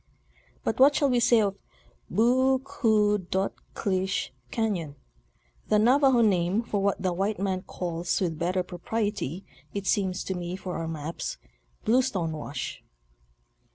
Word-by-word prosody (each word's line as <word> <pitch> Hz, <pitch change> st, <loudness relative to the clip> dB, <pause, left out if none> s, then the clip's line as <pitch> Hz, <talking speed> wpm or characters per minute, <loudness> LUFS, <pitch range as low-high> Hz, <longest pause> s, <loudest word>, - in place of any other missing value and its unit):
But 225 Hz, -, -1 dB
what 275 Hz, +2 st, +7 dB
shall 280 Hz, -3 st, +3 dB
we 245 Hz, -, +3 dB
say 235 Hz, -1 st, +5 dB
of 200 Hz, -1 st, -1 dB, 0.3 s
'" -, -, -34 dB
Boo 260 Hz, +4 st, +4 dB
koo 220 Hz, -6 st, +2 dB
dot 190 Hz, +1 st, -1 dB, 0.2 s
klish 190 Hz, -2 st, -1 dB, 0.2 s
Cafion 185 Hz, -10 st, -1 dB, 0.4 s
;" -, -, -37 dB
the 215 Hz, -, +4 dB
Navajo 255 Hz, +3 st, +5 dB
name 195 Hz, 0 st, +2 dB
for 205 Hz, -3 st, -1 dB
what 200 Hz, 0 st, +1 dB
the 185 Hz, -2 st, 0 dB
white 195 Hz, +4 st, -1 dB
man 190 Hz, -1 st, -1 dB
calls 175 Hz, -2 st, -2 dB
with 165 Hz, -5 st, -1 dB
better 180 Hz, +2 st, 0 dB
propriety, 195 Hz, -1 st, -3 dB, 0.3 s
it 200 Hz, -1 st, -3 dB
seems 190 Hz, -1 st, +1 dB
to 190 Hz, -, -3 dB
me, 175 Hz, 0 st, -4 dB
for 185 Hz, -1 st, -5 dB
our 165 Hz, -, -3 dB
maps, 160 Hz, 0 st, -4 dB, 0.5 s
"Bluestone 220 Hz, -9 st, +2 dB
Wash." 145 Hz, -4 st, -5 dB
195 Hz, 150 wpm, -27 LUFS, 180-225 Hz, 0.5 s, what